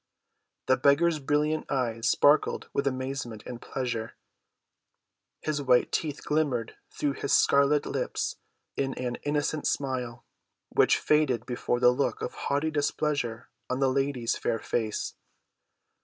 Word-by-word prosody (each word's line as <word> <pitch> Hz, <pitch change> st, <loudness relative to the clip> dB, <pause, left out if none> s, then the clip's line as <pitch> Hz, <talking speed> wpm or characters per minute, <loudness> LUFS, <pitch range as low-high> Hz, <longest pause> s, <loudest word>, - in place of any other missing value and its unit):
The 130 Hz, -, +3 dB
beggar's 155 Hz, +3 st, +3 dB
brilliant 150 Hz, +2 st, 0 dB
eyes 115 Hz, -3 st, 0 dB
sparkled 145 Hz, +2 st, +3 dB
with 140 Hz, -, 0 dB
amazement 130 Hz, -4 st, -3 dB
and 120 Hz, -1 st, -7 dB
pleasure; 120 Hz, -4 st, -4 dB, 1.3 s
his 150 Hz, -2 st, -1 dB
white 125 Hz, -3 st, +3 dB
teeth 150 Hz, -3 st, -2 dB
glimmered 140 Hz, -7 st, 0 dB, 0.2 s
through 145 Hz, -1 st, -1 dB
his 140 Hz, -, -4 dB
scarlet 140 Hz, +1 st, +4 dB
lips -, -, -2 dB, 0.4 s
in 135 Hz, -1 st, -1 dB
an 125 Hz, -1 st, -3 dB
innocent 150 Hz, +1 st, -1 dB
smile, 125 Hz, -4 st, -2 dB, 0.4 s
which -, -, +4 dB
faded 140 Hz, -7 st, +2 dB
before 120 Hz, -1 st, -1 dB
the 125 Hz, 0 st, +6 dB
look 130 Hz, +3 st, -1 dB
of -, -, -3 dB
haughty 145 Hz, +3 st, -1 dB
displeasure 145 Hz, -5 st, -1 dB, 0.2 s
on 130 Hz, -, -1 dB
the 135 Hz, -1 st, +3 dB
lady's 135 Hz, -3 st, 0 dB
fair 115 Hz, -, -1 dB
face. 110 Hz, 0 st, -2 dB
135 Hz, 125 wpm, -28 LUFS, 120-145 Hz, 1.3 s, the